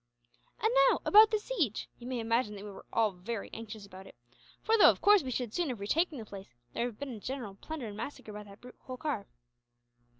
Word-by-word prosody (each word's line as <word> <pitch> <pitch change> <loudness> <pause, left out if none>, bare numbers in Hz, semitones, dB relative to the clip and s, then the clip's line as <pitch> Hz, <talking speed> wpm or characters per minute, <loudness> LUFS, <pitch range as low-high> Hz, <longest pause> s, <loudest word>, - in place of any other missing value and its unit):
"And 440 +2 +1 0.2
now, - - +2
about 430 +1 +8
the 435 - +2
siege. 375 - -2
You 240 - -9
may 255 -1 -2
imagine 230 -1 0
that 200 - -8
we 205 - -7
were 195 - -12
all 225 -2 +2
very 195 +4 -6
anxious 220 -2 -8
about 190 -1 -12
it; - - -15 0.5
for 445 - +3
though, 440 - +8
of - - +1
course, 415 -1 +6
we 260 - -5
should 245 -3 -3
soon 345 -4 0
have 245 -5 -4
retaken 310 - 0
the 225 - -7
place, 195 - -11 0.2
there 235 - 0
would 245 - -4
have - - -25
been 280 -3 -5
a 220 - -8
general 245 -3 -5
plunder 290 +7 -7
and 210 -2 -7
massacre 225 -2 -7
by 210 - -6
that 200 -1 -14
brute 250 0 -13
Holkar." 255 -5 -3
235 Hz, 235 wpm, -31 LUFS, 205-290 Hz, 0.5 s, about